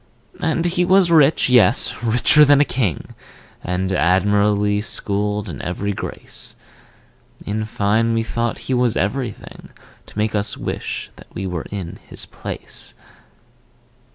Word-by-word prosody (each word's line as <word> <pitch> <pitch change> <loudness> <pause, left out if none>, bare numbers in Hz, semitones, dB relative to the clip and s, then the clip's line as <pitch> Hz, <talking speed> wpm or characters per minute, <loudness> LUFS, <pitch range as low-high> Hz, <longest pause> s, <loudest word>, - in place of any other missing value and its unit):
And 160 +1 0
he 175 +1 +1
was 185 -1 +4
rich, 155 -2 +5
yes, 125 -1 +3
richer 120 +6 +5
than 145 -1 +6
a 145 - +5
king, 110 - -2 0.5
And 95 +1 -1
admirably 105 +3 +2
schooled 105 0 -2
in - - -6
every 100 +3 -3
grace: - - -5 0.9
In 110 +1 -2
fine, 110 +2 +1
we 115 - +1
thought 115 +1 -2
that - - -13
he 130 - -2
was 125 -2 +2
everything 115 +3 -4 0.4
To - - -14
make 105 0 0
us 105 0 -1
wish - - -5
that - - -14
we 95 - -4
were 90 -3 -4
in 95 -4 -6
his - - -1
place. - - -6
105 Hz, 140 wpm, -20 LUFS, 100-125 Hz, 0.9 s, than